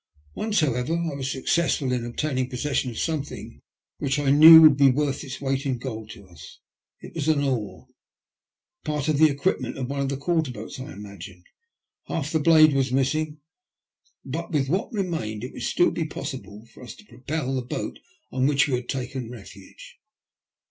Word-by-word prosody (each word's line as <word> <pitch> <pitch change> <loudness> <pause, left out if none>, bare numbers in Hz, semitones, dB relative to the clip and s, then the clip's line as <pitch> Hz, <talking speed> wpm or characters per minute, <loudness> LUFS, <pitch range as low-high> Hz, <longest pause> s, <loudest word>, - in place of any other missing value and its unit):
Once, 215 - 0
however, 135 +1 0
I 170 -3 -2
was 135 -1 -4
successful 140 0 0
in 125 -2 -1
obtaining 130 +1 -2
possession 130 +1 -1
of 115 - -8
something 155 -3 -4 0.4
which 140 0 -1
I 145 -2 +1
knew 160 +3 +10
would 155 -3 +8
be 140 -1 +5
worth 140 +2 -1
its 130 -3 -7
weight 135 -1 -1
in 130 -2 -1
gold 110 -3 -7
to 100 -5 -15
us: 85 -3 -14 0.4
it - - -11
was 155 -2 -3
an 150 -3 +2
oar, 125 -7 -3 1.0
part 150 -1 -2
of 150 -2 +1
the 155 0 +7
equipment 140 +6 -1
of 130 -2 -3
one 140 - -3
of 140 -1 -1
the 140 - -2
quarter 160 0 0
boats 110 +1 -8
I 130 +3 -7
imagined; 100 -3 -11 0.6
half 150 -2 -3
the 160 - +1
blade 155 -1 +6
was 135 -2 0
missing, 150 +3 -1 0.8
but 165 +6 -5
with 140 -4 0
what 190 - -1
remained 165 - -3
it 125 - -7
would - - -8
still 175 - +2
be 165 - -2
possible 130 -8 -7
for - - -15
us 125 - -9
to 210 - -18
propel 135 - -4
the 130 - -1
boat 125 - -5 0.3
on 130 0 +1
which 145 0 +3
we 140 - -2
had 120 0 -8
taken 130 -2 -4
refuge. 100 -4 -13
135 Hz, 185 wpm, -24 LUFS, 125-155 Hz, 1.0 s, knew